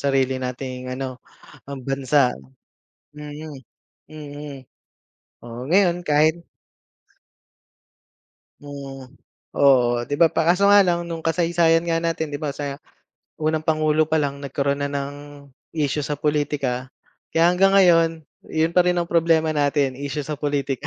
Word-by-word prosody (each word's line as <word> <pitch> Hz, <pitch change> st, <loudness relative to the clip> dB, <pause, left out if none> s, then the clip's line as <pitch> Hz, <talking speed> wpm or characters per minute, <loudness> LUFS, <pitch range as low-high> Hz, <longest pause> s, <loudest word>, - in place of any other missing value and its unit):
sarili 135 Hz, -2 st, +1 dB
nating 125 Hz, 0 st, -5 dB
ano, 130 Hz, -1 st, -5 dB, 0.5 s
ang 135 Hz, -2 st, -7 dB
bansa. 135 Hz, -1 st, +2 dB, 0.9 s
Mm, 150 Hz, -1 st, -8 dB, 0.5 s
mm. 145 Hz, -2 st, -9 dB, 0.9 s
Oo, 120 Hz, +1 st, -8 dB
ngayon 175 Hz, +1 st, +2 dB
kahit 155 Hz, +3 st, +2 dB, 2.2 s
Mm. 135 Hz, -2 st, -10 dB, 0.4 s
Oo, 125 Hz, -4 st, +4 dB
'di 145 Hz, -, -1 dB
ba 165 Hz, +2 st, +5 dB
pa 160 Hz, +1 st, +1 dB
kaso 180 Hz, +3 st, +3 dB
nga 205 Hz, 0 st, +7 dB
lang 175 Hz, -3 st, +1 dB
nung 165 Hz, -1 st, -5 dB
kasaysayan 165 Hz, 0 st, +2 dB
nga 165 Hz, -1 st, 0 dB
natin 160 Hz, -2 st, -2 dB
'di 145 Hz, -, -4 dB
ba 150 Hz, -2 st, -2 dB
sa 140 Hz, -1 st, -5 dB, 0.6 s
unang 155 Hz, 0 st, 0 dB
pangulo 155 Hz, 0 st, +2 dB
pa 160 Hz, 0 st, +1 dB
lang 140 Hz, -1 st, -3 dB
nagkaroon 140 Hz, 0 st, -2 dB
na 140 Hz, -, -2 dB
ng 140 Hz, 0 st, -4 dB, 0.6 s
isyu 150 Hz, -1 st, -1 dB
sa 150 Hz, -, -2 dB
pulitika. 145 Hz, -4 st, -1 dB, 0.5 s
Kaya 165 Hz, +1 st, +5 dB
hanggang 195 Hz, +2 st, +3 dB
ngayon, 170 Hz, -4 st, +5 dB, 0.4 s
yun 160 Hz, +1 st, 0 dB
pa 180 Hz, +1 st, +3 dB
rin 180 Hz, -, +3 dB
ang 170 Hz, 0 st, -2 dB
problema 165 Hz, -1 st, +3 dB
natin 145 Hz, -3 st, 0 dB
issue 145 Hz, +1 st, -4 dB
sa 150 Hz, +1 st, -5 dB
pulitika. 140 Hz, -1 st, -2 dB
150 Hz, 135 wpm, -22 LUFS, 140-165 Hz, 2.2 s, nga